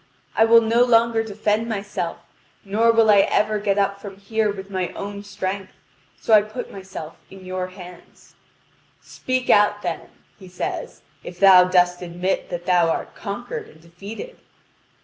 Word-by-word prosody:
I 225 - +5
will 230 0 +6
no 230 +2 +3
longer 230 -1 +3
defend 215 +1 -1
myself, 200 -5 -4 0.5
nor 220 +4 +3
will 225 -1 +4
I 205 - +6
ever 210 +2 +2
get 200 -1 0
up 200 0 0
from 195 -2 -9
here 215 +1 -1
with 195 0 -9
my 185 -2 -1
own 200 0 -6
strength; 195 -1 -5 0.5
so 225 - 0
I 215 - +8
put 215 +4 -7
myself 190 -5 -9
in 190 -1 -13
your 185 0 -4
hands." 180 -2 -14 0.7
"Speak 255 0 -2
out 205 0 +3
then," 175 -2 -4 0.3
he 190 - -13
says, 180 0 -6 0.2
"if 175 0 -10
thou 185 -2 +8
dost 180 -1 +2
admit 180 +2 -3
that 175 0 -5
thou 175 -2 +3
art - - -3
conquered 215 +4 -6
and 155 - -19
defeated." 195 - -10
200 Hz, 160 wpm, -22 LUFS, 185-220 Hz, 0.7 s, I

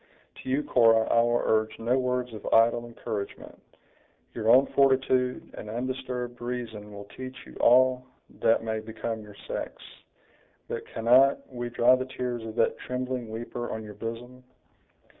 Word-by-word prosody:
To - - -7
you, 140 +3 +1
Cora, 115 -4 +4
I 115 - +5
will 120 0 +1
urge 110 0 +1
no 120 +3 +1
words 125 -1 -1
of 110 - -9
idle 115 +1 +4
encouragement; 110 -3 -6 0.7
your 110 -1 -1
own 130 +4 +7
fortitude 130 -2 +2
and 105 - -8
undisturbed 125 0 -4
reason 115 -4 -5
will 100 0 -9
teach 130 0 -7
you - - -14
all 130 +1 +4 0.3
that 115 - +3
may 110 -1 -2
become 110 0 -5
your 105 -1 -13
sex; - - -4 0.9
but - - -5
cannot 125 +4 +3
we 120 -1 -4
dry 120 +1 +4
the 130 0 +1
tears 125 -2 -4
of 110 -1 -7
that - - +1
trembling 125 -2 -4
weeper 120 +2 -5
on 110 0 -4
your 105 -1 -9
bosom?" 120 +4 -7
120 Hz, 155 wpm, -27 LUFS, 115-125 Hz, 0.9 s, own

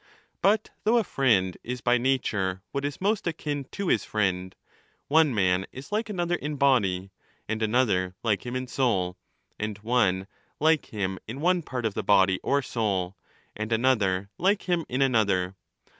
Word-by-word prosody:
But 210 +2 +2
though 225 +3 +4
a 230 - +3
friend 105 - +2
is 125 +1 -4
by 120 0 +3
nature 105 -8 0
what 140 - -2
is 145 0 -3
^ - - -35
most 205 -1 +1
akin 150 -4 -3
to 200 +8 -5
his - - +2
friend, 95 -3 -1 0.5
one 155 0 +5
man 95 -4 +1
is 135 +8 -10
like 220 +2 -1
another 175 -4 -1
in 150 -3 -2
body, 100 -10 +2 0.4
and 110 +1 -2
another 105 -5 +1
like 105 -5 +1
him 120 +1 -5
in 130 0 -2
soul, 115 -9 0 0.4
and 105 -1 -3
one 105 -6 +2 0.3
Hke 155 -1 +3
him 95 -3 -3
in 120 +5 -6
one 180 +3 +2
part 125 -6 -4
of 110 - 0
the - - -2
body 95 -2 +4
or 140 0 +1
soul, 100 -7 -1 0.4
and 110 +1 -4
another 105 -5 +1
like 200 +4 +2
him 175 -3 -1
in 130 +2 +1
another. 100 -7 +1
120 Hz, 175 wpm, -27 LUFS, 95-145 Hz, 0.5 s, one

